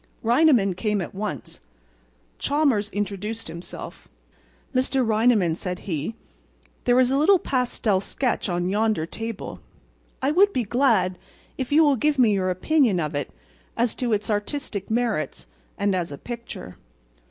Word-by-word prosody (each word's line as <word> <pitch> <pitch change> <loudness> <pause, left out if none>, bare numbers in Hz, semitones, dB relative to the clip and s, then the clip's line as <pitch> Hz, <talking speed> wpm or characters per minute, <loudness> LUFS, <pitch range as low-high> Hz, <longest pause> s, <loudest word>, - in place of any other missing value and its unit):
Reineman 240 - +4
came 210 +2 0
at 180 - -5
once. 195 - -5 0.8
Chalmers 275 -8 +1
introduced 205 +2 -4
himself. 170 +2 -8 0.7
"Mr. 260 0 +1
Reineman," 220 -5 +3
said 180 0 -4
he, 165 +3 -3 0.7
"there 245 0 +4
is 255 0 +4
a 270 - +2
little 375 +7 +5
pastel 250 - 0
sketch 245 0 -1
on 175 0 -1
yonder 210 -3 +1
table. 225 +4 -6 0.6
I 270 +2 +1
would 400 +5 +4
be 250 - +1
glad 215 -6 +2 0.4
if 260 -1 -4
you 310 +2 +6
will 285 -3 +4
give 295 +4 +1
me 235 -5 +5
your 185 -2 0
opinion 215 - +2
of 155 -3 -2
it 145 -1 -2 0.5
as 235 0 +1
to 245 -2 -2
its 210 +1 0
artistic 205 -1 -3
merits 235 +1 -1 0.3
and 200 -1 +1
as 175 -4 -2
a 140 - -6
picture." 235 - -8
220 Hz, 145 wpm, -24 LUFS, 190-255 Hz, 0.8 s, you